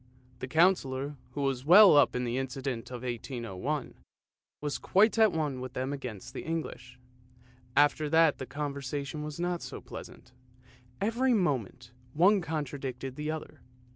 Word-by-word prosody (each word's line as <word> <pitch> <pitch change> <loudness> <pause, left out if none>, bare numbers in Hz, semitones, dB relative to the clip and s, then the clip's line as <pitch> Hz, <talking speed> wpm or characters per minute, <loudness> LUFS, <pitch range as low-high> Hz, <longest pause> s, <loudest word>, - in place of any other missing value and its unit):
The 130 - -5
Councillor, 145 -3 +2 0.2
who 145 - -3
was 135 -2 -1
well 185 +4 +8
up 145 -4 +5
in 125 - -1
the 120 +1 -1
incident 130 -2 -4
of 125 -1 -7
1801, 120 +2 -4 0.7
was 145 -1 -3
quite 215 +4 +3
at 220 -2 +6
one 150 -5 -2
with 130 -1 -6
them 130 +2 -2
against 125 -8 -7
the - - -5
English. 155 -6 -5 0.8
After 145 +1 +3
that 160 -1 +4
the 130 - -5
conversation 140 +1 -4
was 150 +1 -6
not 175 0 -1
so - - -7
pleasant, - - -11 0.7
every 235 +5 +2
moment 125 - -1 0.2
one 190 +6 +4
contradicted 135 -5 -4
the 150 +1 -4
other. 155 0 -6
145 Hz, 145 wpm, -30 LUFS, 130-160 Hz, 0.8 s, well